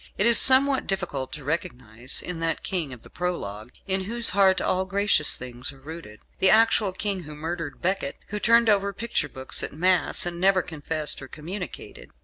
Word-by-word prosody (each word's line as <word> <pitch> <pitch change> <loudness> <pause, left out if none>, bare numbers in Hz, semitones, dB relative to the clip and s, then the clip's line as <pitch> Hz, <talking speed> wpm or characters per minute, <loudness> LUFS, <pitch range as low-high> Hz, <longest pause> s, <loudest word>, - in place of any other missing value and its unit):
It 200 - +2
is 235 -1 +6
somewhat 265 +1 +6
difficult 170 -9 -3
to 150 - -7
recognise 125 -6 -4
in 180 -2 -5
that 165 0 -2
King 170 -7 -3
of 125 -3 -11
the - - -15
Prologue, 115 - -5 0.2
"in 190 -1 -1
whose 235 +1 +4
heart 190 -1 +3
all 185 0 0
gracious 200 -5 +1
things 125 +1 -6
are 135 - -17
rooted," 145 -7 -11 0.2
the 190 - +4
actual 220 -2 +3
King 195 0 -3
who 150 -2 -10
murdered 160 -1 -6
Becket; 185 -6 -1
who 210 - -4
turned 230 +1 +4
over 200 -1 +2
picture 230 -10 -2
books 130 0 0
at - - -3
Mass, 180 +4 +1
and 175 0 -4
never 190 -1 +3
confessed 155 -1 -2
or 135 - -9
communicated. 180 - -8
180 Hz, 185 wpm, -24 LUFS, 145-200 Hz, 0.2 s, is